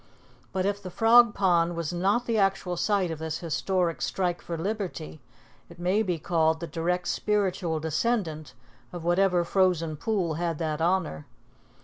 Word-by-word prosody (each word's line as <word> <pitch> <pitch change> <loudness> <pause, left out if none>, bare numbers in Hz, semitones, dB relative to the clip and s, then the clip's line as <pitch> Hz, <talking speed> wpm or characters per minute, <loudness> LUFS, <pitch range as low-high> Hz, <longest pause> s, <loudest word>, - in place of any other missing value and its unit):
But 185 0 -1
if 200 0 -1
the 185 - -7
Frog 230 +4 +5
Pond 175 -3 +2
was 170 0 -3
not 200 +7 +1
the 230 -2 0
actual 195 -2 +1
site 190 -1 +1
of 160 - -5
this 160 -1 -3
historic 170 +1 -1
strike 180 -2 -1
for 170 - -5
liberty, 180 -4 -4 0.5
it 170 - -14
may 180 +5 +1
be 180 -5 -1
called 160 0 +1
the 170 - -4
direct 175 +3 -2
spiritual 190 -6 0
descendant 160 -1 -2 0.4
of 175 -2 -7
whatever 175 +1 +3
frozen 170 -3 +1
pool 185 -1 -1
had 170 -2 -1
that 155 -1 -2
honor. 165 - 0
175 Hz, 155 wpm, -27 LUFS, 165-195 Hz, 0.5 s, Frog